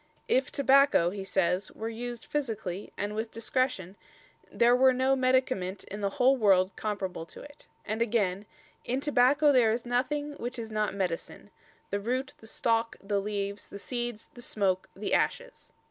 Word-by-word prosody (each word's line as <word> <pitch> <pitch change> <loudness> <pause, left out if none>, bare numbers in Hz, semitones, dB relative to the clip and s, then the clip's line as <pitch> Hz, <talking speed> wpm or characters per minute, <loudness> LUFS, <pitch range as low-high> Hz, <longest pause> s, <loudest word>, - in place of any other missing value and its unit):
"If 260 +1 +2
Tabacco," 275 -10 +4
he 195 0 -5
says, 190 0 0
"were 220 - -5
used 240 +1 -6
physically 220 -9 -3
and 205 +1 -2
with 220 +1 -3
discretion 230 -5 -1 0.6
there 240 +1 +4
were 260 +1 +5
no 260 +1 +2
medicament 255 -8 +1
in 205 +1 -7
the 200 - +1 0.3
worlde 190 -3 +4
comparable 190 -6 -4
to - - -12
it"; 290 0 -14 0.2
and 220 +1 -3
again: 210 -4 0 0.4
"In 255 +2 -1
Tabacco 285 +2 +4
there 240 -4 +5
is 230 +2 -2
nothing 290 +5 -1
which 245 +2 -4
is 225 -1 -6
not 215 -2 -1
medicine, 190 +1 -4 0.4
the 200 - 0
root, 255 +5 -2
the 220 - -13
stalke, 230 0 0
the 200 0 -1
leaves, 200 0 -3
the - - -8
seeds, 240 0 -4
the 240 - -12
smoake, 195 -5 0
the 200 +1 -3
ashes." - - -1
225 Hz, 160 wpm, -29 LUFS, 200-255 Hz, 0.6 s, were